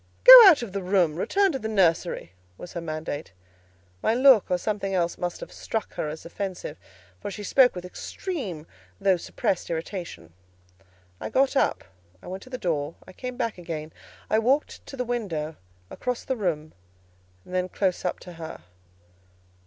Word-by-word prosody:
"Go - - +12
out 315 -9 +6
of 220 - -6
the 200 - -2
room; 180 -4 +2
return 390 - +2
to 270 - -3
the 220 - -4
nursery," 175 - +1 0.3
was 175 - -10
her 170 - -4
mandate. 155 - -5 0.7
My 225 - +2
look 255 -4 +6
or 180 - +2
something 195 0 -2
else 170 -1 0
must 175 -1 -4
have - - -8
struck 225 - -4
her 150 - -3
as 155 +1 -8
offensive, 180 -3 -5 0.4
for - - -5
she 205 +1 -7
spoke 250 +2 +4
with 180 0 -6
extreme 195 - -5 0.3
though 195 -2 +3
suppressed 175 +1 -2
irritation. 170 - -6 0.9
I - - -5
got 270 +1 +2
up, - - +1 0.4
I - - -17
went 190 +1 -6
to - - -13
the 255 - -5
door; 155 -6 -2
I - - -12
came 250 +4 -6
back 230 -6 -2
again; 160 -2 -6 0.3
I 220 - +2
walked 265 +6 0
to 275 - -9
the 250 - -2
window, 175 -11 -3 0.4
across 250 -1 -3
the 260 - -2
room, 160 -8 -2 0.7
then 185 0 -2
close 185 -1 -1
up 180 - -2
to 180 - -10
her. 165 - -8
185 Hz, 170 wpm, -26 LUFS, 170-235 Hz, 0.9 s, Go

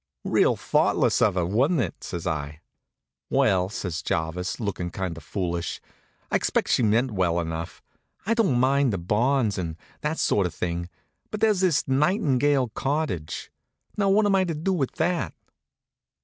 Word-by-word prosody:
"Real - - +3
thoughtless - - +2
of - - +3
her, 90 -2 +1
wa'n't 130 - +2
it?" 120 - -3
says 85 -2 -5
I. 75 -2 -3 0.7
"Well," 90 -1 +2
says 90 -6 -4
Jarvis, 85 0 -2
lookin' 100 -5 -3
kind 90 -1 -4
of 80 - -10
foolish, 85 -1 -3 0.5
"I - - +4
expect - - 0
she - - +3
meant 115 +3 +2
well 90 -4 +1
enough. 85 +1 -5 0.4
I 225 - +2
don't 200 - +2
mind 135 0 +3
the 100 - -1
bonds, 110 +4 +1
and 80 -3 -3 0.2
that 150 +2 -2
sort 100 -3 +2
of 85 - -10
thing, 85 0 -3 0.4
but 215 - -5
there's 215 -3 +3
this 180 -7 +2
Nightingale 140 - +2
Cottage. 130 - -3 0.4
Now, 200 -1 +1
what 210 +2 +4
am 205 - +3
I 190 -1 +4
to 165 -3 -2
do 170 +6 -1
with 140 -8 -1
that?" 160 - -1
110 Hz, 165 wpm, -25 LUFS, -, 0.7 s, I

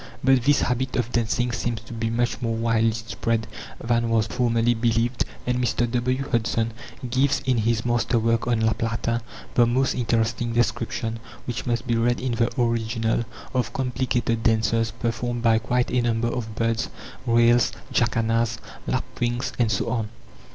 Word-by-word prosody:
But 130 -1 +5
this 145 0 +4
habit 130 +1 -1
of 120 -1 -1
dancing 120 +1 0
seems 115 0 -2
to 115 - -10
be 115 0 -2
much 120 +1 0
more 115 -1 0
widely 115 0 +2
spread 115 0 -2 0.3
than 115 0 +1
was 115 -2 +3
formerly 120 0 +2
believed, 115 +1 +1 0.2
and 125 0 0
Mr. 120 0 +1
W. 130 +2 0
Hudson 115 -1 +1 0.4
gives 130 +3 +2
in 130 -2 +2
his 115 +1 +1
master 120 0 +1
work 115 +1 +1
on 120 -2 +2
La 110 0 +3
Plata 115 +1 -1 0.3
the 120 -1 +5
most 130 +3 +2
interesting 115 -1 0
description, 115 -1 -1 0.3
which 115 -3 -4
must 120 0 0
be 120 -2 +1
read 120 +1 +2
in 130 -1 -2
the 115 0 +1
original, 115 -1 0 0.3
of 120 -3 0
complicated 125 -3 0
dances, 115 0 +2
performed 120 +2 -3
by 115 -1 +4
quite 120 +2 0
a 125 - +2
number 115 0 +1
of 110 -2 -4
birds: 115 0 0 0.4
rails, 120 0 +4 0.2
jacanas, 115 0 +1 0.3
lapwings, 125 -1 -2
and 115 -2 +3
so 100 - 0
on. 115 -3 -1
115 Hz, 160 wpm, -24 LUFS, 115-120 Hz, 0.4 s, But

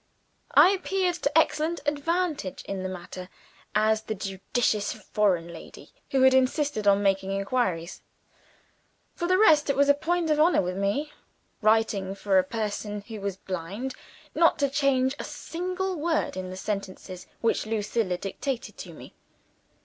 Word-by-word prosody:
I 370 - +8
appeared 380 -1 0
to 285 +2 +1
excellent 320 +1 +2
advantage 300 - -1
in 195 -1 -4
the 185 - -3
matter, 185 0 -8 0.5
as 215 +1 +3
the 220 0 -4
judicious 205 +2 -1
foreign 195 -5 0
lady - - -12 0.2
who 265 -1 +2
had 260 0 +7
insisted 260 -3 +1
on 200 0 +5
making 195 -1 +1
inquiries. 195 -4 -1 1.1
For 345 - -3
the 370 +1 +4
rest, 315 -8 +5
it 280 - +2
was 280 +1 +3
a - - +8
point 330 +2 0
of 300 - +2
honor 320 - +4
with 180 +1 -3
me 200 +10 -1 0.5
writing 215 -3 +2
for 195 -1 +2
a - - +3
person 210 0 -4
who 215 0 -9
was 200 -1 -3
blind 190 +9 -5 0.4
not 335 -1 +4
to 285 -2 +1
change 275 -2 +2
a - - -3
single 370 +2 -4
word 320 - -1
in 185 0 -5
the 185 - -7
sentences 190 -2 -5
which 230 -1 +1
Lucilla 215 -3 -1
dictated 240 - -4
to - - -8
me. - - -12
220 Hz, 155 wpm, -26 LUFS, 195-295 Hz, 1.1 s, I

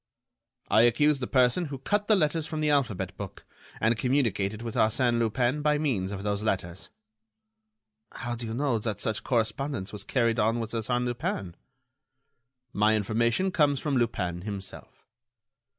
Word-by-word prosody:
"I 110 - +5
accuse 140 +5 +4
the 125 - -3
person 130 +6 +3
who 140 -3 -5
cut 205 +9 -1
the 215 - +5
letters 155 -3 +1
from 155 - -4
the 150 -1 +2
alphabet 100 -10 0
book, 100 -3 -8 0.3
and 110 +2 +2
communicated 110 -5 0
with 115 -2 -4
Arsène 120 +2 +2
Lupin 120 +5 +1
by 150 0 +2
means 115 -11 -1
of 100 -1 -5
those 105 0 -1
letters." 95 -4 -3 1.2
"How 120 -1 -5
do 120 -1 -5
you 110 - -4
know 130 -3 +1
that 110 -1 -3
such 110 -1 -2
correspondence 120 -2 -1
was 105 - -6
carried 115 -3 +1
on 115 +2 +2
with 115 -1 -4
Arsène 120 +2 -1
Lupin?" 115 -7 -3 1.2
"My 105 +1 +3
information 115 - +1
comes 145 -5 +2
from 145 -1 -1
Lupin 90 -8 -1
himself." 100 -1 -8
115 Hz, 155 wpm, -27 LUFS, 105-140 Hz, 1.2 s, I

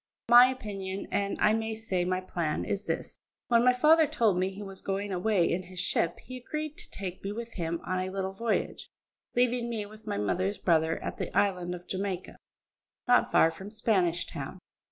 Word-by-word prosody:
My 245 +1 +10
opinion, 200 -6 -4
and 200 0 0
I 215 - +4
may 220 0 -1
say 190 -5 -1
my 185 +1 0
plan, 170 -4 -2
is 200 +1 -3
this: - - -3 0.3
When 235 -1 +5
my 250 - +6
father 310 +5 +5
told 225 -11 +2
me 185 +1 +1
he 195 +2 -8
was 195 -1 -8
going 200 +1 -2
away 185 -1 +2
in 180 - -1
his 185 0 -9
ship, 170 -2 0
he 255 - -8
agreed 305 +4 -5
to - - -10
take 185 -2 -6
me 195 - -3
with 235 +2 -6
him 170 -2 -2
on 185 0 -1
a 185 0 -2
little 190 0 -3
voyage, 225 +3 -2 0.5
leaving 245 -1 +2
me 220 -3 -3
with 215 +1 -14
my - - -1
mother's 185 - 0
brother 160 -2 +2
at - - -4
the - - -3
island 180 -3 +1
of 175 0 -12
Jamaica, 190 -1 -3 0.7
not 245 0 +4
far 165 - +5
from 190 +4 -9
Spanish 185 -6 +1
Town. 140 +6 -7
195 Hz, 195 wpm, -29 LUFS, 180-225 Hz, 0.7 s, My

